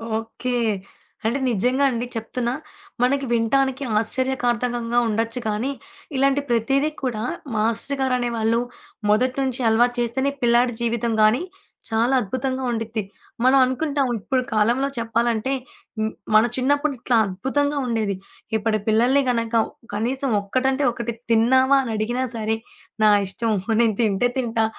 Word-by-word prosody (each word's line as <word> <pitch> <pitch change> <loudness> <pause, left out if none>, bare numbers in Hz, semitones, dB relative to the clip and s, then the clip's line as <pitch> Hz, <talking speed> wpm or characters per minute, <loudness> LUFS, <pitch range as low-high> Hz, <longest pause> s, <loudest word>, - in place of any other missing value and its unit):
Okay. 225 +3 -4 0.7
అంటే 235 +5 +1
నిజంగాండి 250 +3 +1
చెప్తున్నా. 235 +2 -2 0.5
మనకి 275 +2 +2
వినటానికి 265 +4 +1 0.2
ఆశ్చర్యకార్ధకంగా 240 -1 -1
ఉండచ్చు 225 +2 -1
కానీ, 215 +6 -1 0.4
ఇలాంటి 275 +1 +2
ప్రతీదీ 270 +6 +2
కూడా, 230 -4 -2 0.3
మాస్టర్ 230 +6 0
గారనేవాళ్ళు. 240 -3 +1 0.5
మొదటి 250 +5 +2
నుంచి 260 -2 -1
అలవాటు 240 +2 +3
చేస్తేనే, 265 +4 0
పిల్లాడి 240 +1 +3
జీవితం 235 0 0
గానీ, 215 +6 +4 0.5
చాలా 230 +3 +2
అద్భుతంగా 260 +5 -2
ఉండిద్ది. 225 -1 -3 0.4
మనం 260 +2 +5
అనుకుంటాం, 280 +1 0
ఇప్పుడు 260 +5 0
కాలంలో 235 +6 +2
చెప్పాలంటే 230 +1 0 0.5
హ్మ్. 220 0 0 0.2
మన 215 +1 +7
చిన్నప్పుడు 285 +3 +1
ఇట్లా 235 0 +1
అద్భుతంగా 275 +10 -1
ఉండేది. 220 -4 0 0.4
ఇప్పటి 215 0 0
పిల్లల్ని 240 +6 +4
గనక 230 -1 -1 0.4
కనీసం 255 +5 -1
ఒక్కటంటే 265 +7 0
ఒక్కటి 235 0 -4 0.2
తిన్నావా 260 +4 +5
అని 230 -3 -3
అడిగినా 240 +4 -1
సరే! 220 0 -1 0.5
నా 215 - +7 0.2
ఇష్టం. 225 +3 -1 0.3
నేను 225 -3 +2
తింటే 220 +2 +2
తింటా. 230 -3 +1
240 Hz, 120 wpm, -22 LUFS, 225-260 Hz, 0.7 s, మన